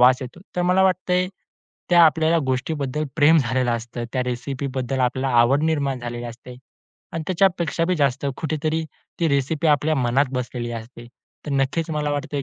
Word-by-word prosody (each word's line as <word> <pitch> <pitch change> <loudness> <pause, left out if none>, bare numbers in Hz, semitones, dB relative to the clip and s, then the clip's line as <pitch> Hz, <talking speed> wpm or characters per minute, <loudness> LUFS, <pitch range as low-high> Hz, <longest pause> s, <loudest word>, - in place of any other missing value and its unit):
वास 125 +1 +7
येतो, 130 +8 -9 0.2
तर 180 - +1
मला 180 +2 +3
वाटतंय, 185 0 +1 0.6
त्या 175 -1 +7
आपल्याला 160 +2 +3
गोष्टीबद्दल 140 +2 -2
प्रेम 160 +2 +6
झालेलं 130 -1 +1
असतं, 120 +1 -4
त्या 130 -1 0
रेसिपीबद्दल 130 +1 -3
आपल्याला 130 +1 0
आवड 135 +5 +4
निर्माण 140 -5 0
झालेली 120 0 -5
असते 120 +1 -9 0.6
आणि 165 - -3
त्याच्यापेक्षा 175 -2 +1
बी 185 - +1
जास्त 140 -1 +1
कुठेतरी 155 0 -1 0.4
ती 165 - +3
रेसिपी 140 +3 0
आपल्या 150 +2 +3
मनात 130 +2 +2
बसलेली 120 -1 -3
असते. 115 +1 -9 0.4
तर - - -3
नक्कीच 140 +5 0
मला 150 -1 -1
वाटतंय, 145 -1 -3
140 Hz, 160 wpm, -22 LUFS, 125-160 Hz, 0.6 s, वास